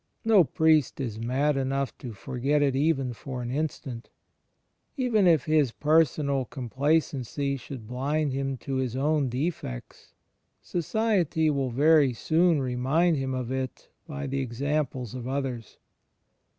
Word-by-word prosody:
No 215 -5 +6
priest 155 -2 +2
is 115 -5 -4
mad 135 +6 +1
enough 135 0 -1
to 125 - -7
forget 135 +6 0
it 135 -2 +1
even 135 -3 +1
for 125 +1 -6
an 120 - -4
instant. 135 -4 -4 0.9
Even 230 -7 +3
if 160 -7 +4
his 155 -5 +3
personal 150 -2 +2
com 125 -2 -7
placency 140 -1 0
should 125 -2 -9
blind 140 +4 -1
him 135 0 -2
to 135 +1 -4
his 130 -2 -2
own 145 0 +1
defects, 125 - -5 0.4
society 175 -4 0
will 135 -2 -1
very 145 +1 +4
soon 165 +5 +2
remind 135 +7 +1
him 135 -1 -2
of 125 -1 -3
it 130 -1 -4 0.2
by 145 -2 -5
the 135 0 -2
examples 130 -1 -2
of 125 -1 -6
others. 130 -4 -4
140 Hz, 135 wpm, -27 LUFS, 130-155 Hz, 0.9 s, No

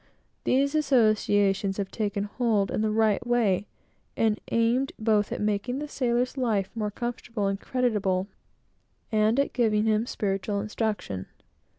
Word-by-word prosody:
These 280 +2 +2
associations 210 -8 +2
have 200 -2 -3
taken 205 -2 -2
hold 210 -2 0
in - - -1
the 220 - +1
right 215 -1 +2
way, 215 -5 +2 0.5
and 220 -2 +1
aimed 235 +4 +2
both 215 -2 +1
at - - -3
making 210 +4 -1
the 300 +1 -4
sailor's 250 -2 0
life 215 -7 0
more 215 -3 -2
comfortable 235 -1 -4
and 195 0 -1
creditable, 210 -7 0 0.9
and 215 +3 +3
at 280 - 0
giving 220 -3 +2
him 220 +1 +1
spiritual 200 -1 -2
instruction. 210 - -3
215 Hz, 135 wpm, -27 LUFS, 205-240 Hz, 0.9 s, and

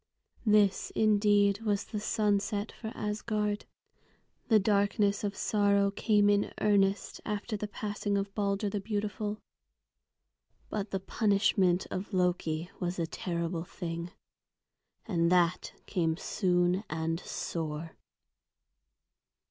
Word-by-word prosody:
This 210 -2 +4
indeed 205 -1 +3
was 205 -2 0
the 210 - -5
sunset 205 0 0
for 220 -2 -7
Asgard. 210 0 -2 0.8
The 220 - +6
darkness 200 0 +2
of 200 -1 -2
sorrow 200 -1 +2
came 205 0 +3
in 205 0 +2
earnest 200 -1 +2
after 210 +2 -3
the 210 0 -3
passing 205 -1 -2
of 195 0 -3
Balder 200 0 0
the 200 +1 -2
beautiful. 210 0 -3 1.3
But 205 -1 -2
the 195 - -2
punishment 195 -3 +2
of 190 +3 -4
Loki 175 -2 0
was 180 0 -2
a 170 - 0
terrible 170 0 -3
thing. 170 -2 -5 1.0
And 170 -5 +1
that 180 -1 +2
came 165 -3 0
soon 180 0 +1
and 160 +1 -1
sore. 160 -3 -4
200 Hz, 110 wpm, -30 LUFS, 180-210 Hz, 1.3 s, The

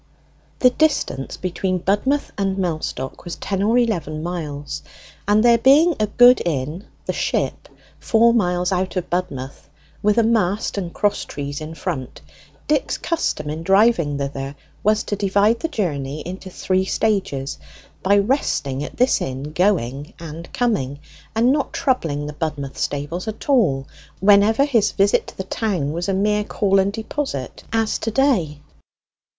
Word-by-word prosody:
The 250 - +5
distance 275 - 0
between 185 +1 -1
Budmouth 205 +11 0
and 195 -1 -1
Mellstock 155 -7 -3
was 175 -1 -5
ten 195 -1 -3
or 220 +4 +3
eleven 170 -10 0
miles, 150 -4 -4 0.5
and 210 +2 +4
there 235 -1 +6
being 290 +8 +6
a 215 - +2
good 245 +4 +6
inn, 155 +4 -3 0.2
'The - - -1
Ship,' - - -2 0.3
four 230 +1 +4
miles 180 -5 +1
out 185 +1 -1
of 180 -1 -3
Budmouth, 140 -7 -4 0.3
with 210 +1 +2
a 230 - +5
mast 215 -3 +1
and 175 -3 -4
cross 205 +3 0
trees 145 +1 -5
in 155 +1 -7
front, 130 -4 -4 0.5
Dick's 295 -2 +1
custom 320 - -2
in 155 +1 -4
driving 190 -5 +3
thither 140 0 -4 0.3
was 215 +1 +3
to 205 - -2
divide 205 +3 +2
the 325 - -1
journey 150 - -3
into 185 +3 -7
three 185 +1 0
stages 190 -11 -1 0.4
by 200 +2 +4
resting 200 - 0
at - - -8
this 250 +1 +3
inn 135 +3 -4
going 150 - 0
and 165 +1 -8
coming, 190 - 0 0.4
and 235 +3 +4
not 285 0 0
troubling 160 - 0
the 150 - -5
Budmouth 150 -3 -4
stables 145 +7 -3
at 220 - -6
all, 185 - +3 0.3
whenever 205 +6 +5
his 230 -7 +2
visit 200 0 +2
to - - -11
the 190 - -3
town 190 -7 -1
was 170 +4 -3
a - - +1
mere 210 +2 +1
call 195 -2 +1
and 195 +1 +2
deposit, 220 - -4
as 225 -1 0
to 225 - -2
day. 215 - +1
190 Hz, 155 wpm, -21 LUFS, 150-220 Hz, 0.5 s, there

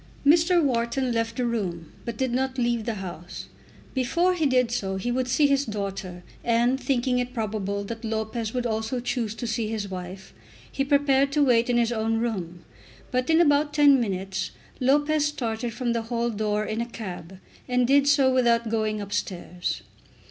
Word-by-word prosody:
Mr. 335 +3 +5
Wharton 250 0 0
left 230 0 -1
the 250 - 0
room, 185 -9 -3
but 235 -2 -4
did 260 0 0
not 260 +1 -1
leave 235 -2 0
the 230 - -2
house. 175 -3 -8 0.4
Before 335 +8 +2
he 325 -4 +1
did 250 -3 +2
so 195 -5 -2
he 215 +6 -2
would 255 +1 0
see 260 +4 +3
his 280 -1 +3
daughter; 195 -5 -5 0.2
and, 240 +3 +2
thinking 255 -2 +1
it 250 +1 -3
probable 200 -3 -2
that 225 +3 -7
Lopez 220 0 -2
would 250 0 -2
also 220 +2 -1
choose 235 -3 -2
to 240 - -5
see 225 -1 -1
his 215 -2 -3
wife, 185 +1 -7 0.4
he 275 - 0
prepared 280 -1 +3
to 295 0 +4
wait 240 -1 +3
in 240 - +3
his 235 0 +2
own 225 -1 0
room. 185 -7 -3 0.5
But, 255 +2 0
in 320 0 +5
about 295 -2 +3
ten 285 -2 +6
minutes, 190 -3 -2 0.3
Lopez 290 +3 +3
started 235 -5 -3
from 240 +1 -1
the 230 - 0
hall 235 +1 -1
door 210 0 -1
in 215 +2 -2
a 235 - -3
cab, 190 -5 -7 0.3
and 250 0 +2
did 280 +2 +4
so 275 -2 +4
without 235 -2 +3
going 215 -1 -1
upstairs. 180 -3 -3
235 Hz, 180 wpm, -25 LUFS, 215-260 Hz, 0.5 s, ten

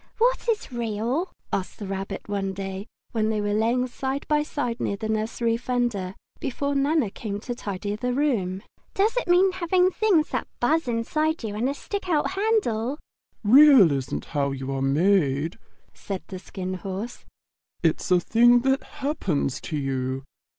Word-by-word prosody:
"What 485 +1 +2
is 435 -10 -1
REAL?" 240 - -1 0.2
asked 185 - -2
the 205 - -6
Rabbit 195 0 -4
one 195 -1 -2
day, 195 +1 -5 0.2
when 220 -2 +1
they 215 -1 0
were 205 0 0
lying 230 +4 +2
side 265 +2 -3
by 300 -1 +3
side 250 -6 -3
near 200 - -1
the 220 - -4
nursery 225 +1 0
fender, 235 -7 -1 0.2
before 280 0 -2
Nana 280 -5 +2
came 205 -2 -5
to 245 - -4
tidy 205 -3 -4
the 250 +4 -2
room. 225 -9 0 0.3
"Does 415 +4 +2
it - - 0
mean 365 +2 +5
having 365 0 +2
things 370 -7 +2
that - - -2
buzz 310 +4 +2
inside 305 +7 0
you 215 -2 -3
and 230 +5 0
a 280 - -2
stick 400 +4 -5
out 305 -1 +2
handle?" 375 - 0 0.5
"Real 255 - +8
isn't 135 -2 -2
how 140 -3 -1
you 135 0 -4
are 135 0 -2
made," 155 +2 +2 0.3
said 195 -2 -6
the 185 - -6
Skin 185 0 -5
Horse. 195 +5 -5 0.6
"It's - - +1
a 180 -1 +5
thing 240 +6 +5
that 270 +2 +2 0.2
happens 180 - -1
to 155 - -1
you. 135 -1 -2
230 Hz, 165 wpm, -25 LUFS, 195-285 Hz, 0.6 s, Real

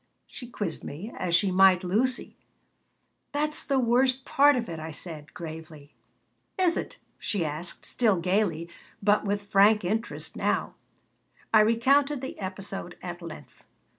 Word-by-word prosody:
she 245 - -10
quizzed 205 -8 -4
me 185 +11 -7
as 170 -1 0
she 190 +2 +3
might 190 0 +5
Lucy 230 +8 0 1.0
"That's 300 +1 0
the 275 - 0
worst 255 +1 +2
part 285 +1 +5
of 240 -2 -2
it," 165 -2 -6
I 160 +1 -6
said, 155 -1 -7
gravely 155 -3 -9 0.6
"Is 360 -2 +3
it?" - - -4 0.2
she 195 -6 -1
asked, 155 +4 -4
still 220 -6 +2
gaily, 180 -2 0 0.4
but 205 +1 +3
with 205 0 -1
frank 205 +1 +4
interest 220 +5 -3
now - - -1 0.8
I 215 - +8
recounted 265 +6 +3
the 265 - -7
episode 195 -1 -6
at 175 -1 -6
length. 155 -5 -11
200 Hz, 140 wpm, -27 LUFS, 170-240 Hz, 1.0 s, I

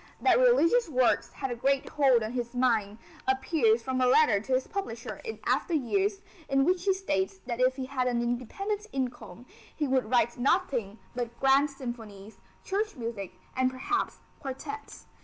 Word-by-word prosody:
That - - +4
religious - - +4
works 255 -4 +2
had 270 -2 -4
a - - -2
great 270 +3 +1
hold 265 -6 +4
on 215 - -3
his 240 -1 -4
mind, 225 -5 +1 0.3
appears 320 - +2
from 260 -1 -1
a 255 - +4
letter 250 -5 +5
to 240 +6 -3
his 255 0 +2
publisher 395 0 -5
in 450 -2 -5
after 345 - +1
years 390 - 0 0.3
in 275 0 +3
which 360 +1 +1
he 390 - +4
states 195 - -1
that 240 -1 -4
if 255 +1 +3
he 265 -1 -4
had 255 -1 -1
an 240 -1 +1
independent 390 - -3
income 245 -5 -5 0.3
he 300 - -1
would 260 -4 +1
write 240 0 +2
nothing 245 - +1 0.2
but 235 -1 -4
grand 270 +2 +4
symphonies, 225 -6 -8 0.2
church 420 +1 -2
music 225 -7 -5 0.2
and 260 0 +2
perhaps 270 +11 -2 0.2
quartets. 285 +11 -7
260 Hz, 170 wpm, -29 LUFS, 240-325 Hz, 0.3 s, letter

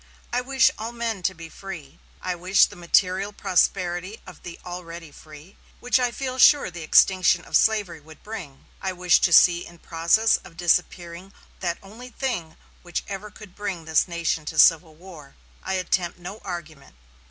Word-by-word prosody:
I 250 - +1
wish 265 0 +3
all 225 +2 -5
men 230 -4 -4
to - - -1
be 165 0 -10
free. 160 -5 -10 0.2
I 185 - -1
wish 180 +3 +4
the - - -11
material 185 +3 +1
prosperity 185 0 -1
of 180 -4 -13
the 170 -1 -10
already 170 -3 -8
free, 155 +5 -15 0.2
which 250 +1 +1
I 250 -1 +1
feel 255 +1 -5
sure 285 -7 +6
the 175 0 -9
extinction 185 +3 +4
of - - -4
slavery 205 -7 +2
would 155 +1 -17
bring. 180 -11 -9 0.2
I 190 -1 -2
wish 180 -1 +3
to 175 - +2
see 175 0 +6
in 170 - -13
process 170 +7 +2
of 165 - -16
disappearing 175 +1 -1 0.3
that 175 -2 -2
only 225 +6 -12
thing 225 - -4 0.2
which 175 -1 -4
ever 200 +1 -6
could 210 -2 -14
bring 185 -5 -5
this 160 +2 +2
nation 170 -2 -2
to 160 - -6
civil 160 0 +5
war. 165 -5 -14 0.3
I 190 - -4
attempt 185 -1 -1
no 180 +4 -9
argument. 160 - -9
180 Hz, 175 wpm, -24 LUFS, 170-205 Hz, 0.3 s, sure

